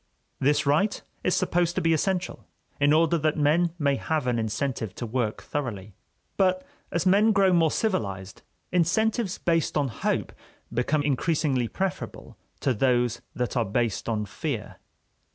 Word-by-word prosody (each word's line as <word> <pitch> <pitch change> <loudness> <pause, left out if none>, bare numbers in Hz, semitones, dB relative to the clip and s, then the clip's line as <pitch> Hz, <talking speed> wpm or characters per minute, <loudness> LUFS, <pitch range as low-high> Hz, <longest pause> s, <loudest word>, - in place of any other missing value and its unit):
This 145 +2 +2
right 155 +9 +2 0.2
is 185 - +2
supposed 175 0 +1
to - - 0
be 165 0 +3
essential 180 +3 -1 0.3
in 145 0 +4
order 165 +2 +3
that 155 +1 0
men 155 +4 +3
may 140 -3 +1
have 155 -2 -1
an 120 -2 +1
incentive 110 -1 -2
to 120 - -4
work 115 -1 -2
thoroughly. 105 -9 -4 0.4
But 185 -1 +2 0.3
as 170 +1 -1
men 205 +4 +5
grow 195 -2 +4
more 165 -2 +4
civilized, 100 - -2 0.3
incentives 195 +4 +1
based 165 -3 0
on 140 -2 +1
hope 110 - -2 0.4
become 145 +5 +1
increasingly 145 -3 +1
preferable 190 - -4 0.3
to 135 - +2
those 120 0 +1
that 125 +1 -2
are 120 - +2
based 115 +2 -1
on 105 -2 -1
fear. - - -5
145 Hz, 150 wpm, -26 LUFS, 120-175 Hz, 0.4 s, men